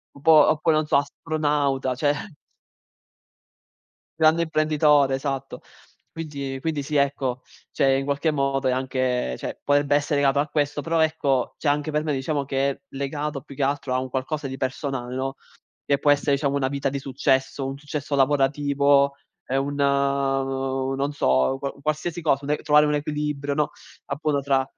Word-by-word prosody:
un 140 Hz, -, -14 dB
po' 160 Hz, -1 st, +7 dB
oppure, 155 Hz, +1 st, +2 dB
non 155 Hz, 0 st, +1 dB
so, 150 Hz, -, +3 dB
astronauta, 145 Hz, -2 st, -1 dB
cioè 145 Hz, +3 st, +2 dB, 2.1 s
Grande 160 Hz, +1 st, +5 dB
imprenditore, 155 Hz, -3 st, +3 dB
esatto. 135 Hz, 0 st, -4 dB, 0.5 s
Quinti 140 Hz, -4 st, -5 dB
quindi 155 Hz, 0 st, -2 dB
sì, 150 Hz, +2 st, -3 dB
ecco, 135 Hz, -3 st, 0 dB, 0.3 s
cioè 135 Hz, -1 st, +2 dB
in 135 Hz, -, -2 dB
qualche 140 Hz, +3 st, 0 dB
modo 135 Hz, -2 st, 0 dB
è 130 Hz, -, +3 dB
anche, 130 Hz, -, -1 dB
cioè -, -, -6 dB
potrebbe 145 Hz, 0 st, +2 dB
essere 145 Hz, 0 st, +1 dB
legato 140 Hz, 0 st, +3 dB
a 150 Hz, -, -1 dB
questo, 145 Hz, -1 st, -1 dB
però 165 Hz, +1 st, 0 dB
ecco, 150 Hz, -5 st, +1 dB
cioè 150 Hz, -, -2 dB
anche 150 Hz, +1 st, 0 dB
per 150 Hz, 0 st, +1 dB
me 155 Hz, -, -1 dB
diciamo 140 Hz, +1 st, -1 dB
che 135 Hz, 0 st, 0 dB
è 135 Hz, -, -7 dB, 0.2 s
legato 140 Hz, 0 st, -3 dB
più 145 Hz, -, -12 dB
che 140 Hz, -, -4 dB
altro 140 Hz, -1 st, 0 dB
a 130 Hz, -, +1 dB
un 130 Hz, 0 st, -5 dB
qualcosa 135 Hz, +2 st, -3 dB
di 130 Hz, -, -5 dB
personale, 130 Hz, -1 st, -3 dB
no, 135 Hz, +1 st, -3 dB, 0.5 s
che 140 Hz, -, +1 dB
può 145 Hz, -, +4 dB
esse 145 Hz, 0 st, 0 dB
diciamo 140 Hz, 0 st, +1 dB
una 135 Hz, -2 st, +1 dB
vita 140 Hz, 0 st, -2 dB
di 140 Hz, +1 st, -3 dB
successo, 135 Hz, 0 st, 0 dB
un 135 Hz, -, -4 dB
successo 145 Hz, 0 st, -5 dB
lavorativo, 140 Hz, 0 st, +3 dB, 0.3 s
ehm, 135 Hz, +1 st, 0 dB
un, 145 Hz, -, -3 dB
non 135 Hz, -1 st, 0 dB
so, 65 Hz, -, +2 dB
qua 140 Hz, 0 st, -4 dB
qualsiasi 155 Hz, +3 st, -2 dB
cosa, 140 Hz, -3 st, +1 dB
un 145 Hz, -, -4 dB
e -, -, 0 dB
trovare 150 Hz, 0 st, +4 dB
un 150 Hz, -, +1 dB
equilibrio, 150 Hz, -1 st, -2 dB
no, 150 Hz, 0 st, 0 dB, 0.3 s
appunto 145 Hz, 0 st, -1 dB
tra 135 Hz, -1 st, +1 dB
140 Hz, 170 wpm, -24 LUFS, 135-150 Hz, 2.1 s, po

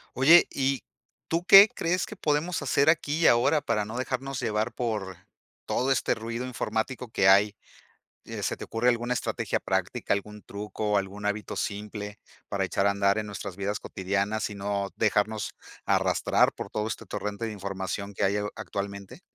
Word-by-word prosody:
Oye 160 Hz, +7 st, +7 dB
y, 135 Hz, -1 st, 0 dB, 0.5 s
¿tú 170 Hz, +2 st, 0 dB
qué 195 Hz, +2 st, +10 dB
crees 180 Hz, 0 st, -1 dB
que -, -, -9 dB
podemos 155 Hz, +2 st, 0 dB
hacer 140 Hz, +1 st, +2 dB
aquí 155 Hz, -1 st, 0 dB
y -, -, +5 dB
ahora 140 Hz, +6 st, +4 dB
para 105 Hz, -5 st, 0 dB
no 110 Hz, +4 st, -6 dB
dejarnos 130 Hz, +1 st, -3 dB
llevar 110 Hz, -1 st, -1 dB
por, 105 Hz, -7 st, -3 dB, 0.5 s
todo 135 Hz, +2 st, +1 dB
este 130 Hz, -, +1 dB
ruido 115 Hz, +3 st, -5 dB
informático 125 Hz, +1 st, -3 dB
que 100 Hz, -3 st, +2 dB
hay? 100 Hz, +2 st, +5 dB, 0.7 s
Eh, -, -, -6 dB
¿se -, -, -1 dB
te -, -, -7 dB
ocurre 115 Hz, +2 st, 0 dB
alguna 120 Hz, 0 st, +1 dB
estrategia -, -, -2 dB
práctica, 95 Hz, +5 st, -1 dB
algún 105 Hz, +1 st, -3 dB
truco, 105 Hz, 0 st, -2 dB
algún 100 Hz, +1 st, -5 dB
hábito 105 Hz, +1 st, -3 dB
simple 105 Hz, 0 st, -5 dB, 0.3 s
para -, -, -1 dB
echar 100 Hz, -, 0 dB
a -, -, +5 dB
andar 100 Hz, +1 st, +2 dB
en 110 Hz, -, -3 dB
nuestras 100 Hz, -2 st, -6 dB
vidas 100 Hz, +1 st, -2 dB
cotidianas 100 Hz, +3 st, -2 dB
y 105 Hz, -, -7 dB
no, 100 Hz, 0 st, -2 dB
dejarnos, 110 Hz, 0 st, 0 dB, 0.3 s
arrastrar -, -, +2 dB
por -, -, -7 dB
todo 105 Hz, 0 st, -2 dB
este -, -, -5 dB
torrente 105 Hz, +2 st, -4 dB
de 110 Hz, -, -4 dB
información 100 Hz, 0 st, -4 dB
que 100 Hz, -, -1 dB
hay 100 Hz, +2 st, +2 dB
ho 105 Hz, 0 st, -2 dB
actualmente? 100 Hz, -1 st, -6 dB
105 Hz, 175 wpm, -27 LUFS, 100-125 Hz, 0.7 s, qué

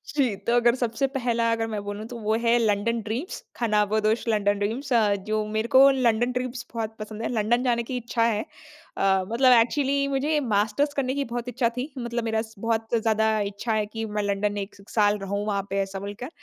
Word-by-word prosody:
जी, 260 Hz, -8 st, +2 dB
तो 235 Hz, +4 st, -1 dB
अगर 240 Hz, 0 st, +4 dB
सबसे 245 Hz, +1 st, -1 dB
पहला 235 Hz, -4 st, 0 dB
अगर 225 Hz, 0 st, 0 dB
मैं 210 Hz, -2 st, -4 dB
बोलूँ, 205 Hz, +1 st, -5 dB
तो 240 Hz, -, -8 dB
वो 215 Hz, 0 st, 0 dB
है, 235 Hz, +1 st, +4 dB
लंडन 225 Hz, +1 st, +1 dB
ड्रीम्स, 230 Hz, -, -5 dB
खानाबदोश 215 Hz, 0 st, +1 dB
लंडन 205 Hz, -2 st, +1 dB
ड्रीम्स 245 Hz, +7 st, -2 dB
अ, 215 Hz, -3 st, +4 dB
जो 215 Hz, +2 st, -2 dB
मेरे 220 Hz, +1 st, -1 dB
को 275 Hz, +1 st, +9 dB
लंडन 245 Hz, -2 st, +2 dB
ड्रीम्स 250 Hz, -1 st, -4 dB
बहुत 225 Hz, -1 st, -3 dB
पसंद 215 Hz, +1 st, -7 dB
है। -, -, -1 dB
लंडन 235 Hz, +2 st, +1 dB
जाने 235 Hz, -2 st, +1 dB
की 250 Hz, +2 st, -4 dB
इच्छा 235 Hz, -1 st, -1 dB
है 220 Hz, -2 st, 0 dB, 0.5 s
अ, 190 Hz, -1 st, +2 dB
मतलब 255 Hz, +3 st, +4 dB
एक्चुअली 275 Hz, +3 st, +1 dB
मुझे 280 Hz, +3 st, +1 dB
मास्टर्स 215 Hz, +8 st, +1 dB
करने 260 Hz, -2 st, 0 dB
की 280 Hz, -, 0 dB
बहुत 240 Hz, 0 st, -3 dB
इच्छा 245 Hz, -1 st, +1 dB
थी, 265 Hz, +5 st, -3 dB
मतलब 235 Hz, -1 st, -3 dB
मेरा 220 Hz, -1 st, 0 dB
स 220 Hz, 0 st, -11 dB
बहुत 225 Hz, -1 st, 0 dB
ज़्यादा 220 Hz, 0 st, +2 dB
इच्छा 215 Hz, +3 st, -3 dB
है 215 Hz, -1 st, +1 dB
कि 225 Hz, +2 st, -5 dB
मैं 210 Hz, -, +1 dB
लंडन 205 Hz, +1 st, -1 dB
1 195 Hz, -, -22 dB
स 200 Hz, -, -16 dB
साल 210 Hz, -1 st, +4 dB
रहूँ, 200 Hz, +1 st, -3 dB
वहाँ 200 Hz, -2 st, 0 dB
पे, 195 Hz, +1 st, -1 dB
ऐसा 195 Hz, 0 st, -4 dB
बोलकर। 205 Hz, +6 st, -6 dB
225 Hz, 210 wpm, -25 LUFS, 210-245 Hz, 0.5 s, को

